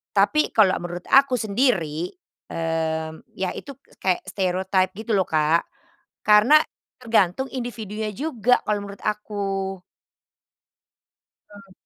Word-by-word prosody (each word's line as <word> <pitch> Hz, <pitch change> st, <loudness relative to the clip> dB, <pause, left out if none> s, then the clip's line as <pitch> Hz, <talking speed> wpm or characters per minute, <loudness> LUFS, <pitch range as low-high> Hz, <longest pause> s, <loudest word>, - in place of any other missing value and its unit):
Tapi 305 Hz, -, +4 dB
kalau 200 Hz, -4 st, +4 dB
menurut 175 Hz, 0 st, -6 dB
aku 270 Hz, -1 st, +6 dB
sendiri, 200 Hz, -, 0 dB, 0.4 s
mmm, 160 Hz, -1 st, -3 dB
ya 185 Hz, -1 st, -2 dB
itu 280 Hz, -1 st, -10 dB, 0.2 s
kayak 185 Hz, -2 st, 0 dB
stereotype 185 Hz, 0 st, 0 dB
gitu 220 Hz, +3 st, -5 dB
loh 190 Hz, -, +1 dB
Kak 155 Hz, +1 st, +2 dB, 0.6 s
karena 215 Hz, +8 st, +7 dB, 0.4 s
tergantung 225 Hz, 0 st, +1 dB
individunya 220 Hz, -4 st, -4 dB
juga 250 Hz, -3 st, +1 dB
kalau 210 Hz, -1 st, 0 dB
menurut 200 Hz, 0 st, -11 dB
aku. 200 Hz, -2 st, -2 dB, 1.7 s
Hmm. 200 Hz, -2 st, -15 dB
200 Hz, 105 wpm, -23 LUFS, 180-225 Hz, 1.7 s, karena